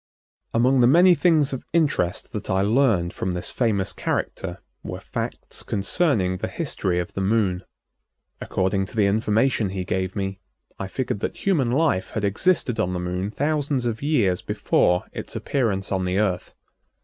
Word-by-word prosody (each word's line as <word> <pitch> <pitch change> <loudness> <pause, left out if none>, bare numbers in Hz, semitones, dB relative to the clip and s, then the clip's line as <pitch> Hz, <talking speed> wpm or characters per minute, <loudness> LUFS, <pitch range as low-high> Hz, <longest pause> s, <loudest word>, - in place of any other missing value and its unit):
Among 125 +3 +3
the 120 - +6
many 175 +7 +7
things 160 -5 +3
of 130 - -4
interest 145 - 0
that - - -5
I 95 0 +2
learned 105 -6 +2
from 90 -1 -2
this 90 - -4
famous 105 -6 0
character - - -3 0.2
were - - -6
facts - - -5
concerning 100 - 0
the - - -3
history 90 -2 -2
of 90 -1 -3
the 95 - -3
Moon. 95 -2 +1 0.8
According 95 +1 0
to - - -11
the 105 -2 +3
information 110 +2 +2
he 95 -1 -3
gave 95 0 -2
me, 95 -1 -3 0.4
I 95 - -3
figured 120 0 -3
that - - -5
human 155 -11 +2
life 135 - +1
had 110 - -1
existed 115 - +1
on 90 -4 0
the 90 - -2
Moon 90 +2 -2
thousands 145 0 -1
of 115 -2 -2
years 120 - +1
before 90 0 +1
its - - -6
appearance 105 -8 -1
on 95 -1 0
the 90 +1 0
Earth. 95 -4 -1
105 Hz, 165 wpm, -24 LUFS, 95-135 Hz, 0.8 s, many